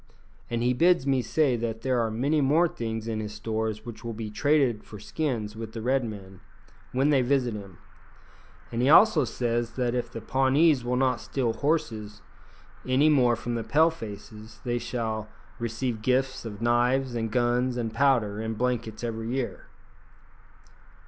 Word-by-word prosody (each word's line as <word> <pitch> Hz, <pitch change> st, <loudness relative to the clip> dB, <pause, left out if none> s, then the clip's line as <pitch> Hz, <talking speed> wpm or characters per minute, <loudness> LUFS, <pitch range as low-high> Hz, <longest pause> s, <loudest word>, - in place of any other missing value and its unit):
And 120 Hz, 0 st, -1 dB
he 125 Hz, +1 st, +3 dB
bids 170 Hz, +2 st, +3 dB
me 135 Hz, -2 st, +2 dB
say 135 Hz, +2 st, +1 dB
that 115 Hz, -1 st, -3 dB
there 130 Hz, -2 st, +1 dB
are 115 Hz, -1 st, +1 dB
many 140 Hz, +8 st, +1 dB
more 155 Hz, +6 st, +4 dB
things 115 Hz, -5 st, -5 dB
in 110 Hz, -1 st, -2 dB
his 105 Hz, -1 st, -5 dB
stores 110 Hz, 0 st, -3 dB
which 120 Hz, -1 st, -9 dB
will 115 Hz, -1 st, -4 dB
be 110 Hz, -1 st, -5 dB
traded 135 Hz, -3 st, +2 dB
for 105 Hz, -, -11 dB
skins 110 Hz, -3 st, -3 dB
with 110 Hz, 0 st, -7 dB
the 115 Hz, -, -5 dB
Red 130 Hz, +2 st, +2 dB
men, 95 Hz, -4 st, -8 dB, 0.5 s
when 135 Hz, +4 st, +2 dB
they 135 Hz, -3 st, +4 dB
visit 125 Hz, -2 st, +1 dB
him; 100 Hz, -5 st, -9 dB, 0.9 s
and 115 Hz, -, -1 dB
he 130 Hz, -, +3 dB
also 165 Hz, -3 st, +6 dB
says 120 Hz, -1 st, -2 dB
that 125 Hz, -2 st, -1 dB
if 120 Hz, -1 st, -2 dB
the 115 Hz, -, -6 dB
Pawnees 135 Hz, +4 st, +3 dB
will 125 Hz, +1 st, -1 dB
not 130 Hz, -1 st, +1 dB
steal 125 Hz, -5 st, -1 dB
horses 115 Hz, -10 st, -2 dB, 0.6 s
any 130 Hz, +4 st, +3 dB
more 125 Hz, -5 st, +4 dB
from 120 Hz, +1 st, -4 dB
the 115 Hz, -1 st, -2 dB
Pale 155 Hz, +9 st, +3 dB
faces, 110 Hz, -4 st, -10 dB
they 120 Hz, -1 st, -1 dB
shall 110 Hz, -3 st, -3 dB, 0.3 s
receive 115 Hz, 0 st, -3 dB
gifts 130 Hz, +2 st, 0 dB
of 110 Hz, 0 st, -6 dB
knives, 125 Hz, +2 st, +2 dB
and 115 Hz, -1 st, -2 dB
guns, 125 Hz, +2 st, +1 dB
and 115 Hz, -2 st, -3 dB
powder, 115 Hz, -5 st, +2 dB
and 110 Hz, -1 st, -4 dB
blankets 120 Hz, -2 st, -2 dB
every 115 Hz, -1 st, -3 dB
year." 130 Hz, 0 st, -3 dB
120 Hz, 170 wpm, -27 LUFS, 110-130 Hz, 0.9 s, also